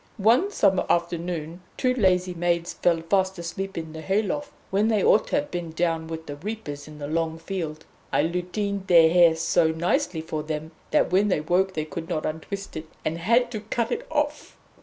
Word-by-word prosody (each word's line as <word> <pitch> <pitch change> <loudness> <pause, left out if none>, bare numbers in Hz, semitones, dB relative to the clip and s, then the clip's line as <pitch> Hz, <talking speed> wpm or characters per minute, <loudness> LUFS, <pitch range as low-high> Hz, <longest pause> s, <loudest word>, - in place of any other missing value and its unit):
One 230 - +4
summer 195 - +3
afternoon 170 -1 -1 0.2
two 255 -1 +2
lazy 185 -6 +2
maids 170 0 0
fell 170 -2 +1
fast 190 +2 +1
asleep 185 +3 -5
in 160 -1 -5
the 160 - -7
hay 195 +6 +1
loft, 290 +7 -3 0.2
when 200 +3 +2
they 215 -3 +2
ought 215 - +4
to - - -1
have 290 0 -1
been 175 -2 -3
down 165 -1 0
with 160 0 -6
the 145 - -7
reapers 155 -6 -6
in 155 0 -11
the 145 - -5
long 160 +1 -1
field. 165 -3 -5 0.3
I - - +3
lutined 190 +3 -2
their 165 -2 +7
hair 170 -2 +6
so 165 +1 +2
nicely 170 - 0
for 160 -1 -4
them 155 +1 -4 0.2
that - - +2
when 195 +3 +4
they 185 -6 +1
woke 185 +4 +1
they 155 -1 -1
could 165 +3 -7
not 155 -3 -1
untwist 195 +6 -5
it, 155 0 -6 0.2
and 165 +2 -1
had 235 +7 +3
to 220 - -3
cut 225 +3 -2
it - - -3
off! 295 -1 -2
175 Hz, 200 wpm, -25 LUFS, 160-200 Hz, 0.3 s, their